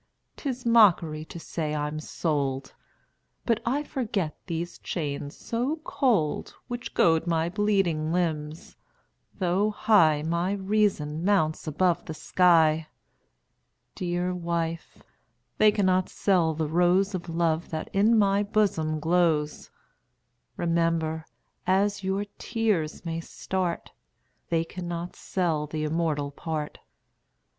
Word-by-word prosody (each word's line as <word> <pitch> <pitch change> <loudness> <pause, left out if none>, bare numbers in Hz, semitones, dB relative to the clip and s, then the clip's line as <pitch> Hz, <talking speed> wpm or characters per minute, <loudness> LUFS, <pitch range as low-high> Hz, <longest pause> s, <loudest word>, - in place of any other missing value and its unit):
'Tis 255 -4 -4
mockery 180 -9 +4
to 170 - -9
say 155 -2 -3
I'm 150 +1 -2
sold! 140 -4 -2 0.7
But 230 -2 +1
I 280 +5 +1
forget 210 - -2
these 170 0 -4
chains 145 -3 -4
so 245 +6 -2
cold, 215 - 0
Which 245 0 -6
goad 165 0 +3
my 165 0 +1
bleeding 190 -6 +1
limbs; 160 -3 -2 0.6
though 190 +2 +1
high 170 -8 +4
My 170 +4 0
reason 190 -6 0
mounts 165 -6 +1
above 175 +3 +1
the 160 - -6
sky. 160 -3 +3 1.1
Dear 180 0 -2
wife, 170 -1 -3 0.6
they 215 0 +7
cannot 185 -3 +2
sell 175 -5 +2
the 160 0 -1
rose 180 +5 +3
Of 175 -2 -4
love 165 0 0
that 155 -1 -4
in 215 +4 +4
my 200 -1 +3
bosom 195 -7 +1
glows. 160 -2 +1 0.9
Remember, 165 -2 0 0.4
as 200 +1 +2
your 195 +2 -1
tears 210 -10 -1
may 165 0 -2
start, 180 +1 -3 0.6
They 165 -1 +2
cannot 175 0 -5
sell 165 -5 -1
the 155 +1 -3
immortal 155 -2 -1
part. 155 0 -5
170 Hz, 115 wpm, -27 LUFS, 155-195 Hz, 1.1 s, they